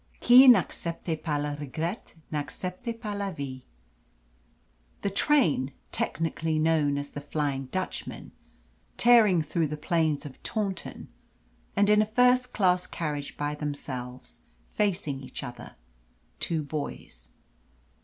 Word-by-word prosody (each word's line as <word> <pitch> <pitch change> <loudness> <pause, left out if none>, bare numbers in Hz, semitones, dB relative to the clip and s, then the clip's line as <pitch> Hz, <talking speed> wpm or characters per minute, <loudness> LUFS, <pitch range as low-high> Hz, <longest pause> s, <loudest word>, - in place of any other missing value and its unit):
Qui 255 +2 +8
n'accepte 170 -8 +2
pas 150 -3 -1
le 145 0 -2
regret 160 - -4 0.2
n'accepte 180 - -4
pas 210 -3 -4
la 200 -1 -2
vie. 140 -6 -7 1.4
The 200 - 0
train 195 - +2 0.2
technically 160 -1 -1
known 155 -2 +2
as 145 0 -5
the 145 - -6
"Flying 145 -2 -2
Dutchman," 185 +8 -5 0.7
tearing 220 -8 +6
through 160 +1 0
the 150 +1 -5
plains 155 -1 0
of 135 -3 -10
Taunton, 200 -5 -4 0.7
and 205 +1 +4
in 210 0 +5
a 215 - +1
first 250 +2 +3
class 180 -3 +2
carriage 150 -3 -4
by 145 0 -1
themselves, 130 -4 -6 0.3
facing 175 -9 0
each 130 - -8
other, 120 -2 -9 0.6
two 160 -2 -1
boys. 140 - -6
160 Hz, 120 wpm, -28 LUFS, 145-200 Hz, 1.4 s, Qui